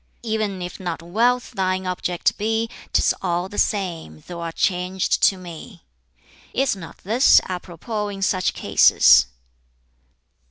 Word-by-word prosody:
'E'en 215 Hz, -4 st, -2 dB
if 175 Hz, -, -7 dB
not 175 Hz, -3 st, -5 dB
wealth 235 Hz, +8 st, +1 dB
thine 185 Hz, -3 st, -1 dB
object 180 Hz, -1 st, -1 dB
be, 225 Hz, +2 st, 0 dB, 0.2 s
'Tis -, -, +3 dB
all 175 Hz, +1 st, -1 dB
the 205 Hz, -, -5 dB
same, 170 Hz, -, -2 dB
thou'rt 170 Hz, -1 st, -7 dB
changed 185 Hz, 0 st, 0 dB
to 195 Hz, -, +4 dB
me.' 175 Hz, +1 st, -11 dB, 0.7 s
"Is 270 Hz, -4 st, +1 dB
not 170 Hz, -4 st, -11 dB
this 230 Hz, +7 st, +5 dB
apropos 185 Hz, +4 st, -5 dB
in 195 Hz, -1 st, -5 dB
such 185 Hz, -1 st, 0 dB
cases?" 60 Hz, 0 st, +5 dB
185 Hz, 125 wpm, -22 LUFS, 175-210 Hz, 0.7 s, this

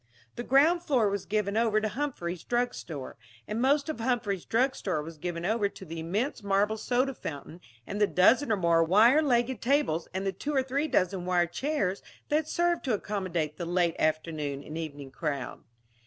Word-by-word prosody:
The -, -, -4 dB
ground 295 Hz, +8 st, +4 dB
floor 250 Hz, -11 st, +2 dB
was 200 Hz, -1 st, -3 dB
given 210 Hz, -1 st, 0 dB
over 220 Hz, -1 st, +3 dB
to 215 Hz, -, -1 dB
Humphrey's 210 Hz, -, -4 dB
drug 245 Hz, 0 st, 0 dB
store; 145 Hz, -6 st, -7 dB, 0.3 s
and 215 Hz, +2 st, -2 dB
most 280 Hz, +3 st, +3 dB
of 310 Hz, -6 st, -4 dB
Humphrey's 225 Hz, -6 st, -1 dB
drug 255 Hz, +4 st, +2 dB
store 165 Hz, -6 st, -2 dB
was 160 Hz, 0 st, -10 dB
given 175 Hz, 0 st, -4 dB
over 210 Hz, 0 st, +1 dB
to 190 Hz, -, -12 dB
the 165 Hz, 0 st, -6 dB
immense 205 Hz, -, -2 dB
marble 200 Hz, +2 st, +1 dB
soda 255 Hz, +4 st, 0 dB
fountain 160 Hz, -, -8 dB, 0.2 s
and 205 Hz, -, -4 dB
the 210 Hz, -, +5 dB
dozen 230 Hz, +9 st, +4 dB
or 215 Hz, -, +3 dB
more 170 Hz, -2 st, +3 dB
wire 220 Hz, -, +5 dB
legged 245 Hz, -4 st, +1 dB
tables 255 Hz, -, +1 dB
and 190 Hz, +1 st, -3 dB
the 195 Hz, -, +1 dB
two 290 Hz, +10 st, -4 dB
or 265 Hz, -, +3 dB
three 275 Hz, +4 st, -1 dB
dozen 185 Hz, -, +1 dB
wire 175 Hz, -1 st, +3 dB
chairs 200 Hz, -, -2 dB, 0.3 s
that 305 Hz, +1 st, +1 dB
served 345 Hz, +1 st, +1 dB
to 250 Hz, -5 st, +2 dB
accommodate 180 Hz, -7 st, -3 dB
the 175 Hz, -, -4 dB
late 175 Hz, -1 st, +1 dB
afternoon 155 Hz, -3 st, -1 dB
and 155 Hz, -, -8 dB
evening 145 Hz, -4 st, -6 dB
crowd. 140 Hz, -3 st, -4 dB
205 Hz, 190 wpm, -28 LUFS, 170-255 Hz, 0.3 s, the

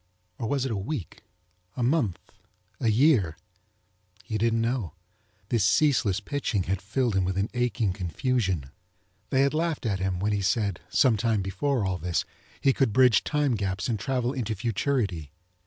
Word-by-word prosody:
Or 115 Hz, -, -2 dB
was 140 Hz, -2 st, 0 dB
it 130 Hz, -, -2 dB
a -, -, -1 dB
week? 100 Hz, -, -5 dB, 0.6 s
A 125 Hz, -, 0 dB
month? 120 Hz, -, +1 dB, 0.6 s
A -, -, 0 dB
year? 110 Hz, -, +3 dB, 0.9 s
He 110 Hz, +4 st, -3 dB
didn't 115 Hz, +1 st, +2 dB
know. 115 Hz, -, -1 dB, 0.6 s
This 115 Hz, -5 st, +2 dB
ceaseless 105 Hz, -2 st, +3 dB
pitching 105 Hz, -3 st, -2 dB
had 95 Hz, +1 st, -2 dB
filled 115 Hz, +2 st, 0 dB
him 95 Hz, -, +2 dB
with 95 Hz, +1 st, -1 dB
an 100 Hz, +3 st, -1 dB
aching 120 Hz, -5 st, 0 dB
confusion. 95 Hz, -, -1 dB, 0.6 s
They 135 Hz, -, +3 dB
had 140 Hz, +1 st, +2 dB
laughed 160 Hz, -3 st, -1 dB
at 100 Hz, -4 st, 0 dB
him 95 Hz, -1 st, -1 dB
when 105 Hz, +3 st, 0 dB
he 100 Hz, -1 st, 0 dB
said, 100 Hz, -1 st, 0 dB
some 115 Hz, +3 st, +4 dB
time 110 Hz, -2 st, +1 dB
before 105 Hz, +5 st, -1 dB
all 95 Hz, -2 st, -1 dB
this, 85 Hz, 0 st, -1 dB, 0.3 s
he 135 Hz, -, +3 dB
could 130 Hz, -6 st, +1 dB
bridge 125 Hz, -2 st, +5 dB
time 150 Hz, -3 st, +1 dB
gaps 95 Hz, -3 st, -2 dB
and 110 Hz, -4 st, -1 dB
travel 125 Hz, +3 st, -1 dB
into 115 Hz, -5 st, -2 dB
futurity. 105 Hz, -, -1 dB
110 Hz, 170 wpm, -27 LUFS, 95-130 Hz, 0.9 s, bridge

